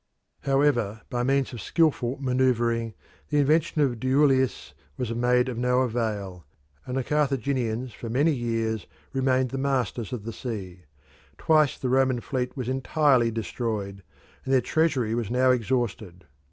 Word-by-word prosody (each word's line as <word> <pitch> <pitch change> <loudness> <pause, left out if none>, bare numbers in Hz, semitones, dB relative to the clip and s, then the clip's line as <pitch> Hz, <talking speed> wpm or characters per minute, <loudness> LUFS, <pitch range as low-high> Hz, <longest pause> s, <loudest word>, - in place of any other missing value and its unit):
However, 135 -7 +1
by 120 - -1
means 135 +1 +1
of 120 - -6
skilful 140 -6 +1
manoeuvring 120 -4 +1 0.3
the 150 - +1
invention 155 +2 +2
of 120 -5 -1
Duilius 130 0 +2 0.2
was 120 -2 -2
made 125 +1 +2
of 120 -2 -4
no 125 +1 +2
avail, 105 -7 -2 0.4
and 125 - -3
the 135 - 0
Carthaginians 130 -4 -1
for 115 - -7
many 140 +8 +2
years 115 -4 -2 0.3
remained 130 -1 +1
the 135 - -4
masters 125 -5 -1
of 120 -5 -5
the 115 +1 -6
sea. 95 - -6 0.5
Twice 155 -3 +3
the 130 - -3
Roman 130 -1 +2
fleet 125 +1 -3
was 125 -3 -3
entirely 130 -1 +2
destroyed, 110 -3 -4 0.4
and 135 - -4
their 135 - +5
treasury 135 -6 +1
was 115 -3 -2
now 130 +1 +3
exhausted. 115 -7 -2
125 Hz, 145 wpm, -26 LUFS, 115-135 Hz, 0.5 s, their